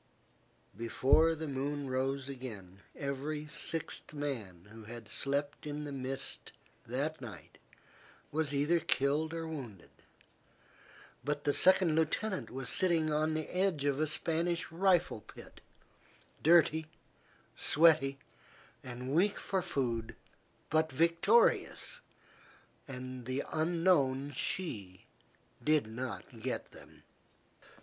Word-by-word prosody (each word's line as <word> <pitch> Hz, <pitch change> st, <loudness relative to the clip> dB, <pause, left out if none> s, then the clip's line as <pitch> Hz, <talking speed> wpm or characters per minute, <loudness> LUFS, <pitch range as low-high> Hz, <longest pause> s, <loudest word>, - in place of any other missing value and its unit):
Before 135 Hz, +8 st, +3 dB
the 160 Hz, 0 st, -5 dB
moon 140 Hz, +1 st, -2 dB
rose 130 Hz, +1 st, -1 dB
again, 110 Hz, -9 st, -8 dB, 0.2 s
every 145 Hz, +2 st, -3 dB
sixth 160 Hz, 0 st, -1 dB
man 110 Hz, -12 st, -4 dB
who 110 Hz, -1 st, -11 dB
had 115 Hz, 0 st, -9 dB
slept 140 Hz, +6 st, -2 dB
in 150 Hz, 0 st, -4 dB
the 145 Hz, -, -5 dB
mist 135 Hz, 0 st, -3 dB, 0.3 s
that 140 Hz, +5 st, -2 dB
night 120 Hz, -5 st, -10 dB, 0.7 s
was 155 Hz, -1 st, 0 dB
either 145 Hz, +4 st, +2 dB
killed 150 Hz, +2 st, +1 dB
or 165 Hz, 0 st, -4 dB
wounded; 125 Hz, -, -7 dB, 1.3 s
but 145 Hz, 0 st, -2 dB
the 145 Hz, -, +2 dB
second 185 Hz, -3 st, +5 dB
lieutenant 185 Hz, +5 st, 0 dB
was 130 Hz, 0 st, -5 dB
sitting 165 Hz, -, +2 dB
on 155 Hz, +1 st, +1 dB
the 155 Hz, -1 st, -2 dB
edge 180 Hz, -6 st, +1 dB
of 140 Hz, -1 st, +1 dB
a 155 Hz, -, +2 dB
Spanish 165 Hz, +2 st, -1 dB
rifle 180 Hz, +1 st, +2 dB
pit, -, -, -14 dB, 0.8 s
dirty, 160 Hz, -1 st, +5 dB, 0.7 s
sweaty, 150 Hz, -4 st, +4 dB, 0.7 s
and 125 Hz, +1 st, -5 dB
weak 195 Hz, +6 st, +3 dB
for 190 Hz, -2 st, -1 dB
food, 115 Hz, -7 st, -2 dB, 0.6 s
but 160 Hz, -1 st, +3 dB
victorious, 170 Hz, -, +3 dB, 0.9 s
and 130 Hz, -2 st, -6 dB
the 130 Hz, +2 st, -1 dB
unknown 155 Hz, -5 st, +2 dB
she 105 Hz, -, -3 dB, 0.6 s
did 155 Hz, -4 st, +3 dB
not 120 Hz, +1 st, -6 dB
get 130 Hz, +2 st, -3 dB
them. -, -, -15 dB
145 Hz, 110 wpm, -33 LUFS, 130-160 Hz, 1.3 s, second